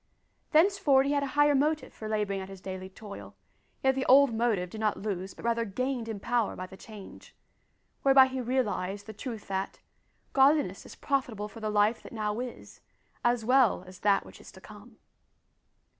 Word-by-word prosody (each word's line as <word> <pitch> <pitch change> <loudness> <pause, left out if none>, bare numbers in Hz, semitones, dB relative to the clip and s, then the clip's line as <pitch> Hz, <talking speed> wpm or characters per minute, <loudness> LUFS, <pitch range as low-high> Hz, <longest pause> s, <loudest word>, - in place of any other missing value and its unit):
Thenceforward 315 -5 +4
he 280 - 0
had 285 -1 +1
a 280 - -1
higher 290 0 +5
motive 300 +3 0
for 215 - -8
labouring 210 -2 -1
at 190 - -8
his 195 -1 -10
daily 185 0 -7
toil, 185 - -11 0.5
yet 265 0 +4
the 265 0 -2
old 275 -1 +6
motive 220 -6 0
did 220 - -7
not 215 -1 +1
lose 195 -2 -4
but - - -11
rather 235 0 +1
gained 240 +2 -3
in 215 -3 -4
power 235 +1 0
by 185 - -6
the 185 - -12
change 205 0 -12 0.7
whereby 270 -1 +7
he 260 0 -4
realised 205 -6 -2
the 220 - -8
truth 225 0 -7
that, 195 0 -3 0.6
"godliness 280 +3 +3
is - - -11
profitable 250 -7 -2
for 210 +2 -12
the 215 -1 -3
life 210 +2 +2
that - - -12
now 215 0 -2
is 250 -1 -8 0.4
as 240 -2 +1
well 250 -6 +4
as 185 0 -13
that 200 -1 +2
which - - -14
is - - -13
to - - -13
come." - - -14
225 Hz, 190 wpm, -29 LUFS, 200-265 Hz, 0.7 s, whereby